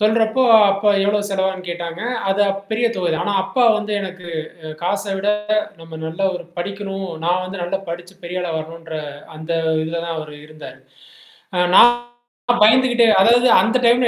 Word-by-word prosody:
சொல்றப்போ 220 +3 +2 0.3
அப்பா 200 +2 0 0.2
எவ்ளோ 205 +1 +1
செலவாகுன்னு 190 -2 -2
கேட்டாங்க, 170 0 -5 0.3
அது 195 +1 0
அப் 195 0 -2
பெரிய 225 +2 +1
தொகை 180 - -1
தான். 160 +2 -1
ஆனா 205 - -1
அப்பா 255 +5 0
வந்து 215 -1 -4
எனக்கு 185 -2 -8 0.4
அ - - -6
காச 200 +3 -1
விட 200 +2 -2 0.5
நம்ம 165 0 -12
நல்லா 170 +5 -2
ஒரு - - -9
படிக்கனும், 195 +1 -5 0.2
நான் 180 +2 +1
வந்து 185 0 -6
நல்லா 190 +2 -2
படிச்சு 175 +2 -8
பெரிய 180 +1 -4
ஆளா 175 - -3
வரனுன்ற 165 0 -8 0.4
அந்த 160 +2 -5 0.3
இதில 165 +1 -4
தான் 165 -1 -4
அவரு 155 -1 -8
இருந்தாரு. 155 -4 -12 0.8
அ - - 0 0.2
நான் 240 - +8 0.7
பயந்துகிட்டே, 240 +1 +4
அதாவது 240 +5 +5
அந்த 230 +2 +1
டைம்ல 240 +1 +4
190 Hz, 165 wpm, -19 LUFS, 170-210 Hz, 0.8 s, நான்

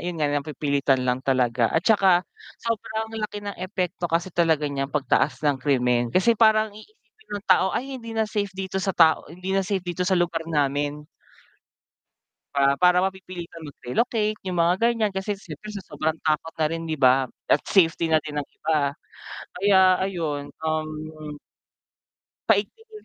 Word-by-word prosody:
yun 175 0 -4
nga 150 -2 +1
napipilitan 140 -2 0
lang 125 0 0
talaga 125 -3 +1
at 165 +3 0
'tsaka, 190 -4 +4 0.3
sobrang 220 -1 -3
laki 210 -1 -5
ng 205 - -5
epekto 185 -2 -3
kasi 170 +2 -1
talaga 160 -3 +2
niyang 135 -1 -2
pagtaas 140 0 +1
ng 145 -3 +1
krimen 125 -3 +1
kasi 185 - +3
parang 220 -1 +3
iisipin 430 - -19
ng 205 - -9
tao 190 - +4
ay 265 +1 -4
hindi 230 -1 -8
na 220 - +2
safe 205 -2 -3
dito 190 0 -3
sa 190 -1 -2
tao 160 -3 +4
hindi 185 +4 -5
na 195 - +2
safe 190 -1 -2
dito 175 0 -5
sa 185 +1 +2
lugar 170 -2 -1
namin 145 0 -1 1.5
para 140 0 +3
para 180 0 +5
mapipilitan 180 -4 -6
mag-relocate 215 - -1
yung 180 -2 -2
mga 170 +1 +4
ganyan 220 -4 0
kasi 195 +2 -3
siyempre 215 +1 -10
sa 200 -3 -7
sobrang 160 +1 -2
takot 155 +1 0
na 155 - +2
rin 165 0 -3
'di 160 - -2
ba? 130 -1 +4 0.2
At - - +4
safety 165 -3 +3
na 160 -1 +4
din 150 -1 -3
ng - - -8
iba, 150 -3 +1 0.7
kaya 195 +1 +4 0.2
ayun, 160 -7 -3 0.2
um 155 0 -1 1.6
paigtingin 430 - 0
175 Hz, 160 wpm, -24 LUFS, 145-200 Hz, 1.6 s, para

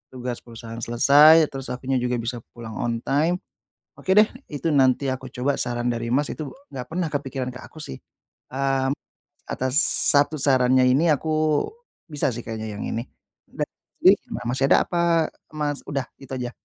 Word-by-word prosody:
Tugas 125 -1 -4
perusahaan 115 -1 -9
selesai, 145 +7 +6
terus 135 -1 -6
akunya 130 +1 -2
juga 125 0 -1
bisa 120 +1 -3 0.2
pulang 115 -2 -8
on 115 -1 -2
time, 155 +6 +2 0.6
oke 190 - -6
deh, 215 - +8 0.2
itu 145 +2 -5
nanti 135 0 +3
aku 130 0 -9
coba 130 +3 -1
saran 120 -1 -2
dari, 115 -1 -1
Mas, 145 +4 +2
itu 155 -3 -6 0.2
nggak 125 -1 -6
pernah 175 +1 -1
kepikiran 135 -3 -3
ke 125 - -9
aku - - -13
sih. 110 - -8 0.5
Mmm, 135 0 0 0.5
atas 130 +1 -2 0.3
1 145 +1 +3
sarannya 130 -1 +4
ini, 150 +5 +4
aku 155 0 +1 0.4
bisa 145 -4 -1
sih 120 - -5
kayaknya 110 -2 -6
yang - - -4
ini. 115 - -3 0.4
Dah, - - -4 0.3
jadi - - +7
gimana 120 - -7
masih 135 - +1
ada - - +7
apa, 170 -2 +2 0.2
Mas, 150 -2 -3
udah 135 -2 -3
itu 135 -1 -12
aja? 125 -2 -3
130 Hz, 170 wpm, -24 LUFS, 120-145 Hz, 0.6 s, deh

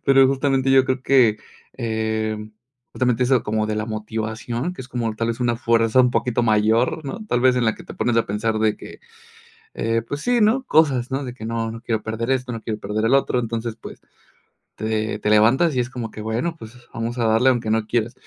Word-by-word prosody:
Pero, 135 -1 +6
justamente, 135 0 +1
yo 135 -1 +6
creo 130 0 -2
que, 125 -6 +4 0.3
em, 110 -1 -3 0.4
justamente 125 -1 +1
eso, 130 -2 +2
como 110 0 -1
de 110 - -2
la 110 - -1
motivación, 110 +6 -4
que 180 - -10
es 125 - -13
como 115 -4 -2
tal 115 +1 -1
vez 115 +2 -3
una 120 -1 +1
fuerza 115 0 +3
un 125 -1 +4
poquito 120 -1 0
mayor, 110 +6 +2
¿no? 215 +11 -6
Tal 120 -11 0
vez, 130 0 +4
en 125 - +1
la 110 - +2
que - - -13
te - - -10
pones 120 -1 0
a 115 - +3
pensar 110 +2 -1
de 110 -1 +1
que, - - -12 0.7
eh, 115 0 0
pues 145 +3 -4
sí, 245 -2 +2
¿no? 225 +5 +3
Cosas, 135 -5 +2
¿no? 135 +1 -1
De 125 - -6
que 115 -3 -9
no 115 0 -2
no 115 0 -9
quiero 110 -2 -2
perder 115 +3 -3
esto, 125 -1 -1
no 115 -2 -5
quiero 110 -1 -4
perder 105 +2 -2
el 120 - +2
otro, 135 -2 +1
entonces, 115 -1 -3
pues, - - -11 0.7
te 110 -1 -2
te 105 - -1
levantas 120 +10 +4
y 125 - +1
es 120 - -1
como 120 -4 -6
que, 110 - -8
bueno, 120 +10 -2
pues, 110 +1 -10 0.2
vamos 115 +1 -4
a 115 - 0
darle 115 +4 +4
aunque 120 -3 0
no 110 -1 0
quieras. 115 0 -1
115 Hz, 225 wpm, -22 LUFS, 110-130 Hz, 0.7 s, Pero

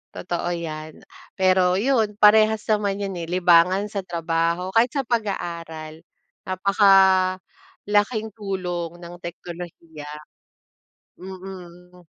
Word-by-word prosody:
Totoo 175 -1 -3
yan. 155 -2 -7 0.3
Pero 185 -1 +3
yun, 220 -1 +1
parehas 215 +1 +5
naman 200 -2 +1
yun, 195 -1 -3
eh, 165 - -5
libangan 180 +2 +4
sa 200 - -3
trabaho, 170 +1 -1
kahit 235 +2 +4
sa 275 - 0
pag-aaral, 170 -8 -4 0.5
napakalaking 200 - +2
tulong 180 -5 -4
ng 175 0 -10
teknolohiya. 170 -3 -9 1.1
Mm. 180 -1 -11
185 Hz, 95 wpm, -23 LUFS, 170-205 Hz, 1.1 s, parehas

